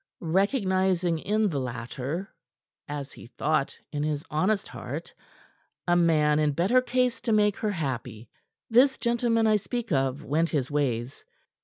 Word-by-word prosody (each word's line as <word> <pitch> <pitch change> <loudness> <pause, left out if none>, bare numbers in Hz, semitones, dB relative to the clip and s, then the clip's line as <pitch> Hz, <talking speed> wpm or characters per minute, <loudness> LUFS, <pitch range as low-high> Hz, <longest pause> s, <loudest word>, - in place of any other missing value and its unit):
Recognizing 190 - +2
in 215 +5 +1
the 145 -5 -2
latter 130 - -5 0.5
as 145 -1 -5
he - - -12
thought 145 +3 -1
in 145 -1 -3
his 150 0 -2
honest 190 +7 +1
heart - - -7 0.7
a 175 - +4
man 155 -3 +3
in 150 -1 +2
better 195 - +3
case 250 -1 0
to 235 -1 -1
make 210 -2 +3
her 215 - -1
happy, 125 - -4 0.4
this 265 +4 +4
gentleman 235 -1 +1
I 215 -1 +4
speak 240 +2 -4
of 135 -1 0
went 160 +4 +1
his 140 -3 -1
ways. 130 -3 -1
170 Hz, 145 wpm, -27 LUFS, 145-215 Hz, 0.7 s, a